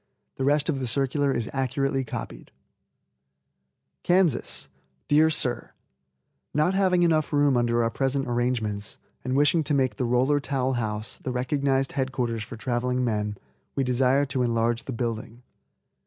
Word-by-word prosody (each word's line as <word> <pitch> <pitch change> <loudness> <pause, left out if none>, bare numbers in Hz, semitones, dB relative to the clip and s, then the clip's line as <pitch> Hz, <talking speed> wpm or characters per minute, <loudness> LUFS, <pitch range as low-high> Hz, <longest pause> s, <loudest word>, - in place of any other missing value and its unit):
The 135 - -2
rest 145 +2 +2
of 145 -5 0
the 130 - -2
circular 140 +3 +1
is 120 -4 -2
accurately 135 0 0
copied: 85 - -7 1.5
KANSAS. 180 - +2 0.4
Dear 155 +2 +5
Sir: 130 -5 -1 0.8
Not 155 +5 +2
having 185 -2 +3
enough 160 -3 +2
room 145 -2 +3
under 120 -1 +2
our 115 - 0
present 135 +1 -1
arrangements, 120 -4 -2 0.3
and 130 +1 -1
wishing 150 +3 +3
to 145 - 0
make 130 -6 +1
the 125 - 0
Roller 130 +5 +2
Towel 135 -2 -1
House 110 -3 -3
the 130 - -4
recognized 135 +1 0
head 135 -1 -2
quarters 120 -4 -2
for 110 +2 -8
traveling 125 +2 -1
men, 105 -2 -1 0.4
we 135 - +1
desire 130 +2 +2
to 135 -2 -2
enlarge 115 -1 0
the - - -5
building. 115 0 -4
130 Hz, 150 wpm, -26 LUFS, 120-140 Hz, 1.5 s, Dear